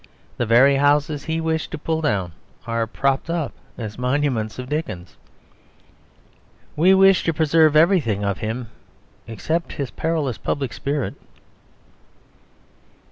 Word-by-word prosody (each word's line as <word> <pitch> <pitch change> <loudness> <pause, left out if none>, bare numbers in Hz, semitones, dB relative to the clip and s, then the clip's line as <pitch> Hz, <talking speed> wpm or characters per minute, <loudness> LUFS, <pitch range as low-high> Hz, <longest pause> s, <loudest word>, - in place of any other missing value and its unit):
The 120 - -1
very 130 +5 +5
houses 145 +1 +1
he 160 0 -1
wished 160 0 -2
to - - -5
pull 160 +1 -2
down 100 - -1 0.3
are 115 -1 -1
propped 135 +6 -1
up 165 -4 -2 0.3
as 110 -1 -6
monuments 125 -4 -1
of 125 0 -6
Dickens. 145 - -5 1.6
We 185 +5 +5
wish 195 0 +5
to 165 - 0
preserve 155 0 +3
everything 150 - +3
of 100 -1 -1
him, 115 +2 -4 0.6
except 160 +10 -3
his 140 -3 -4
perilous 155 - -2
public 135 +1 -3
spirit. 140 +7 -2
140 Hz, 125 wpm, -21 LUFS, 115-160 Hz, 1.6 s, very